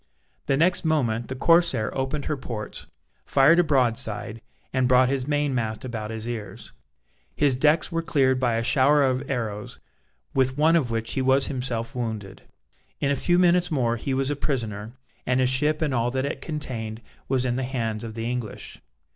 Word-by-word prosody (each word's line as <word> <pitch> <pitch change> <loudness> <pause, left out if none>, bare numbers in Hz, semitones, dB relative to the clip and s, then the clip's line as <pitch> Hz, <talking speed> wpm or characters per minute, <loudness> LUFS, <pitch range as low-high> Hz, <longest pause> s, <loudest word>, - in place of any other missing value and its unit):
The 135 - +2
next 180 +5 +2
moment 120 -8 0
the 130 - -5
corsair 165 -6 +3
opened 135 +2 -2
her 150 - -1
ports, 115 -6 -7 0.4
fired 145 +5 +5
a - - +6
broadside, 115 -6 -1 0.3
and 130 -1 +2
brought 130 0 +5
his 135 -1 -1
main 145 -1 +1
mast 110 -1 -2
about 115 -4 -5
his 110 0 -5
ears. 110 -4 -6 0.6
His 145 -3 +3
decks 150 +7 +2
were 165 0 0
cleared 135 -5 +2
by 120 -3 +1
a 115 - 0
shower 140 +3 +4
of 130 +1 0
arrows, 110 -6 -4 0.5
with 130 0 +1
one 160 +3 +4
of 145 -8 +2
which 115 0 -2
he 135 - -1
was 135 +1 +3
himself 125 -4 -3
wounded. 110 -5 -5 0.6
In 140 - +1
a - - +2
few 175 +5 +1
minutes 180 0 +4
more 125 -7 +1
he 130 +4 -2
was 135 +1 0
a - - -1
prisoner, 115 -6 -3 0.3
and 125 0 +2
his 130 0 +3
ship 150 +4 +1
and 150 -3 0
all 120 -1 +1
that 130 +2 -1
it 140 - -4
contained 115 -8 -5 0.3
was 130 -1 +1
in 120 -1 0
the 130 - -1
hands 115 -4 -3
of 110 -1 -7
the 115 0 -3
English. 120 -3 -5
130 Hz, 190 wpm, -25 LUFS, 115-145 Hz, 0.6 s, a